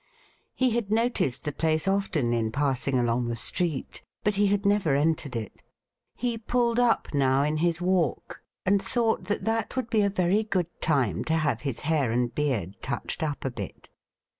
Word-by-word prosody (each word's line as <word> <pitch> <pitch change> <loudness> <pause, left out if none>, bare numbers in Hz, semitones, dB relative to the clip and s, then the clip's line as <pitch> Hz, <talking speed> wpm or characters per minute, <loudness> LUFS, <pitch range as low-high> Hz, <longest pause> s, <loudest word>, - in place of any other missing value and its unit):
He 260 -1 +2
had 225 -3 -1
noticed 225 - +1
the 150 - -2
place 160 +3 0
often 190 -11 +1
in 115 -2 0
passing 135 0 +1
along 120 0 +1
the 120 - -2
street, 160 +5 -2 0.2
but 210 - +2
he 200 +1 +2
had 200 +1 0
never 200 -8 +3
entered 150 -2 0
it. 110 -3 -6 0.5
He 240 -2 -2
pulled 235 +1 +1
up 240 -8 +2
now 135 -1 +3
in 150 +1 0
his 170 +1 +1
walk, 180 -5 0 0.2
and 195 +1 +3
thought 225 -6 0
that 205 +2 -2
that 225 +1 -1
would 255 -2 -3
be 220 -3 +3
a 200 - +3
very 190 +1 +2
good 185 -5 -3
time 130 - +1
to 160 - +1
have 145 -8 0
his 135 -5 -3
hair 145 -6 +1
and 120 0 0
beard 115 - -2
touched - - -3
up 150 -3 -2
a 135 - -1
bit. 105 -6 -8
160 Hz, 185 wpm, -27 LUFS, 130-205 Hz, 0.5 s, never